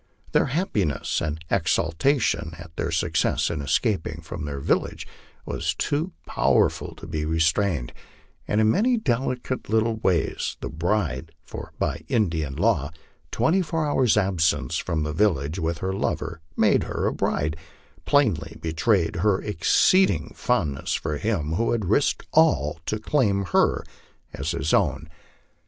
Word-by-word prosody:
Their - - +3
happiness 110 - -1
and 75 +1 -2
exultation 85 - +1
at 85 -2 -12
their - - -2
success 80 0 +1
in 80 -3 -3
escaping 80 - 0
from 80 -1 -6
their 70 -1 -4
village - - -1 0.4
were - - -4 0.2
too 155 +6 -1
powerful - - +1
to - - -11
be 75 -1 -3
restrain 80 0 +1
ed, - - -10 0.5
and 105 - +1
in 110 0 +4
many 240 - +2
delicate 130 - -2
little 110 +1 +2
ways 90 -6 0
the - - -5
bride 80 -3 -1
for - - -9
by 80 - -2
Indian 80 - 0
law 70 - +1 0.4
twenty 185 +4 +2
four 160 -2 -1
hours 130 -5 +3
1 105 -2 +3
absence 80 -9 +1
from 80 -2 -1
the 75 0 -3
village 80 -3 +1
with 80 0 -1
her 95 - -1
lover 80 -3 -2 0.2
made - - +3
her - - -2
a - - +1
bride 75 +2 -1 0.5
plainly 115 - +1
be 80 -1 -4
trayed 90 -2 +1
her 100 +2 +2
exceeding 145 - +2
fondness 80 - 0
for 75 -2 -2
him 85 -6 -1
who 115 +8 +1
had 110 -4 -1
risked 110 +10 +1
all 115 - +3
to 110 - 0
claim 105 -5 +1
her - - +3 0.5
as 70 - -3
his 80 -3 -1
own. 80 - +1
85 Hz, 150 wpm, -24 LUFS, 80-115 Hz, 0.5 s, in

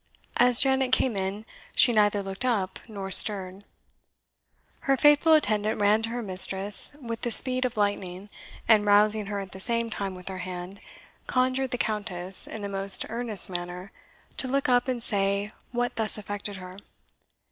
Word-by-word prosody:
As 245 0 +5
Janet 265 -1 +3
came 255 -3 +1
in, 195 +2 -4 0.3
she 245 - +5
neither 205 -2 +2
looked 195 +3 -6
up 210 -7 -1
nor 200 -3 -7
stirred. 190 -1 +3 1.2
Her 275 -1 +1
faithful 295 +3 +5
attendant 215 -8 +2
ran 210 +2 +3
to 225 - -2
her 240 +1 -4
mistress 195 +6 +1
with 230 -4 -6
the 240 - -1
speed 255 +2 +3
of 245 -3 -4
lightning, 200 -2 -2 0.4
and 220 -2 +5
rousing 210 0 +3
her 205 -1 -3
at 195 -2 -8
the 190 - -10
same 230 +2 -1
time 195 -3 -4
with 180 0 -13
her 190 -1 -6
hand, 180 +2 -7 0.5
conjured 255 +1 0
the 245 - -3
Countess, 195 -5 -2
in 215 - -8
the - - -3
most 195 0 -1
earnest 230 -4 +1
manner, 180 +1 -6 0.5
to 260 - -1
look 275 +2 0
up 245 0 +2
and 250 -3 -3
say 200 0 -1 0.2
what 245 0 -2
thus 220 -1 0
affected 205 0 -5
her. 185 0 -10
210 Hz, 170 wpm, -26 LUFS, 195-245 Hz, 1.2 s, As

